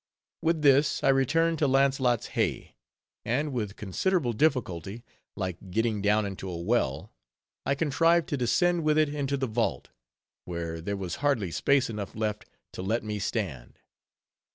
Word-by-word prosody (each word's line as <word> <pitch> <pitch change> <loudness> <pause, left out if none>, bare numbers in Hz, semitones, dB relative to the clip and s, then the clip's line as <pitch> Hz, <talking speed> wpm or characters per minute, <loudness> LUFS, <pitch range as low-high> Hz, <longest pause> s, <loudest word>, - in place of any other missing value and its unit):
With 160 -1 +1
this, 140 0 +4
I - - +4
returned 160 +5 +2
to 150 - +3
Launcelott's 135 -3 +2
Hey; - - -1 0.5
and 140 +5 -1
with 105 -4 -3
considerable 125 - 0
difficulty, 115 - -1 0.3
like 95 -1 -5
getting 110 +2 0
down 105 +1 +2
into 95 -1 -5
a 85 - -4
well, 85 - -1 0.5
I 140 - +2
contrived 165 +3 +2
to 150 - 0
descend 170 +8 +2
with 155 0 +2
it 155 -1 +3
into 140 -1 -1
the 135 - -1
vault; 115 -1 -1 0.6
where 85 -2 -4
there 100 +4 -3
was 90 -3 -4
hardly 135 -11 0
space 140 +8 +2
enough 105 -3 -6
left 105 -1 -3 0.2
to - - -6
let 110 +5 -1
me 105 -1 -3
stand. 85 - -4
120 Hz, 155 wpm, -28 LUFS, 100-145 Hz, 0.6 s, this